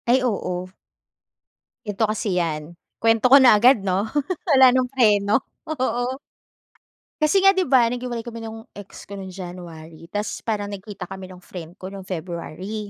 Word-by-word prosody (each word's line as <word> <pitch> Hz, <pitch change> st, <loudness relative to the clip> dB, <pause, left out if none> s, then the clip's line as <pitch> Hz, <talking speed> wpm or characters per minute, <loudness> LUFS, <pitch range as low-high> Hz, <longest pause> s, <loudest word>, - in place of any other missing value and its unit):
Ay 255 Hz, +2 st, +5 dB
oo. 185 Hz, -6 st, -2 dB, 1.1 s
Ganito 210 Hz, +1 st, 0 dB
kasi 215 Hz, -3 st, -1 dB
yan, 165 Hz, -1 st, -3 dB, 0.2 s
kwento 225 Hz, 0 st, +3 dB
ko 270 Hz, +2 st, +8 dB
na 245 Hz, -5 st, +7 dB
agad, 240 Hz, +1 st, +5 dB
'no? 195 Hz, +1 st, 0 dB, 0.4 s
Wala 265 Hz, -6 st, +7 dB
ng 255 Hz, 0 st, +2 dB
preno. 210 Hz, -3 st, +3 dB, 0.2 s
Oo. 255 Hz, -4 st, -1 dB, 1.1 s
Kasi 305 Hz, +5 st, +3 dB
nga, 390 Hz, -, +8 dB
'di 375 Hz, -6 st, 0 dB
ba, 255 Hz, -3 st, +6 dB
naghiwalay 240 Hz, -1 st, -3 dB
kami 230 Hz, -1 st, -7 dB
nung 225 Hz, 0 st, -8 dB
ex 200 Hz, -1 st, -11 dB
ko 200 Hz, -, -11 dB
nung 195 Hz, -1 st, -7 dB
January. 170 Hz, -3 st, -10 dB
Tapos 210 Hz, +1 st, -4 dB
parang 205 Hz, -2 st, -3 dB
nagkita 200 Hz, -1 st, -7 dB
kami 190 Hz, 0 st, -9 dB
ng 185 Hz, -, -11 dB
friend 180 Hz, -1 st, -10 dB
ko 185 Hz, 0 st, -8 dB
nung 195 Hz, -1 st, -8 dB
February. 185 Hz, +4 st, -5 dB
205 Hz, 160 wpm, -23 LUFS, 185-245 Hz, 1.1 s, ko